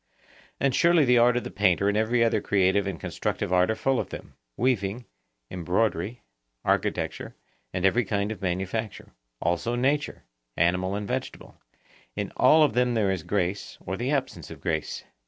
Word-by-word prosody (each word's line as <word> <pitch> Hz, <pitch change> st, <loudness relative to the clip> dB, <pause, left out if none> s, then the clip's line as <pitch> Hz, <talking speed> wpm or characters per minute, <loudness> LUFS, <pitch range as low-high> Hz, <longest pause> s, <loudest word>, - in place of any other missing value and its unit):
And 140 Hz, -2 st, +1 dB
surely 170 Hz, -1 st, +4 dB
the 125 Hz, -1 st, +5 dB
art 120 Hz, +1 st, +4 dB
of 125 Hz, -, -1 dB
the -, -, -7 dB
painter 100 Hz, -1 st, +2 dB
and 100 Hz, -, +1 dB
every 115 Hz, +2 st, +2 dB
other 115 Hz, -, +2 dB
creative 100 Hz, 0 st, +2 dB
and 95 Hz, -5 st, -4 dB
constructive 90 Hz, -, -3 dB
art 90 Hz, +1 st, +4 dB
are 110 Hz, -, +1 dB
full 135 Hz, +1 st, +1 dB
of -, -, -3 dB
them,—weaving, 105 Hz, -, -3 dB, 0.5 s
embroidery, 90 Hz, +4 st, -1 dB, 0.4 s
architecture, -, -, -1 dB, 0.4 s
and 95 Hz, 0 st, -1 dB
every 120 Hz, +6 st, +3 dB
kind 100 Hz, +1 st, -1 dB
of 110 Hz, -, -7 dB
manufacture; 95 Hz, +4 st, -3 dB, 0.3 s
also 85 Hz, +8 st, -1 dB
nature, 140 Hz, +4 st, 0 dB, 0.3 s
animal 90 Hz, +3 st, +1 dB
and 105 Hz, 0 st, -4 dB
vegetable,—in 130 Hz, +1 st, -7 dB
all 155 Hz, 0 st, +6 dB
of 150 Hz, -, +2 dB
them 125 Hz, 0 st, +2 dB
there 105 Hz, -4 st, +2 dB
is 95 Hz, -3 st, -2 dB
grace 95 Hz, +2 st, -2 dB
or 95 Hz, -, -5 dB
the 120 Hz, +6 st, -3 dB
absence 135 Hz, -, -2 dB
of -, -, -10 dB
grace. -, -, -3 dB
105 Hz, 160 wpm, -26 LUFS, 95-125 Hz, 0.5 s, all